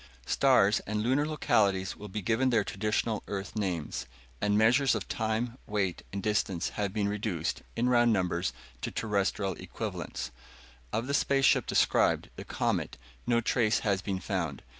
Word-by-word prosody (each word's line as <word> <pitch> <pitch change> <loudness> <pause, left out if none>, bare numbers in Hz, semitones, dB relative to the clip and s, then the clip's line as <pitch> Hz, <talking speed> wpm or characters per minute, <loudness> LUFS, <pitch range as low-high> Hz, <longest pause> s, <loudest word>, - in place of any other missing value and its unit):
Stars 110 - +4
and 105 +1 -1
lunar 135 +5 +2
localities 100 -10 +1
will 105 - -9
be 105 +1 -5
given 120 +6 +2
their 115 -4 +3
traditional 105 +2 -1
Earth 100 +1 -5
names; 90 -7 -2 0.3
and 105 0 +2
measures 125 +5 +4
of - - -4
time, 115 +2 -2
weight, 100 -4 -1
and 100 0 -4
distance 100 -5 0
have 100 -2 -2
been 105 0 0
reduced, 100 -5 -2
in 120 +2 +1
round 120 -1 +4
numbers, 90 -4 0 0.3
to - - -2
terrestrial 100 -2 -1
equivalents. - - -5 0.6
Of 115 +2 -1
the 140 - -2
space 140 -1 +3
ship - - +4
described, - - +2
the - - -7
Comet, - - -1 0.3
no 120 -1 +3
trace 115 -2 +2
has 100 -4 +1
been 95 -1 -2
found. 85 -8 -3
105 Hz, 160 wpm, -30 LUFS, 95-115 Hz, 0.6 s, Stars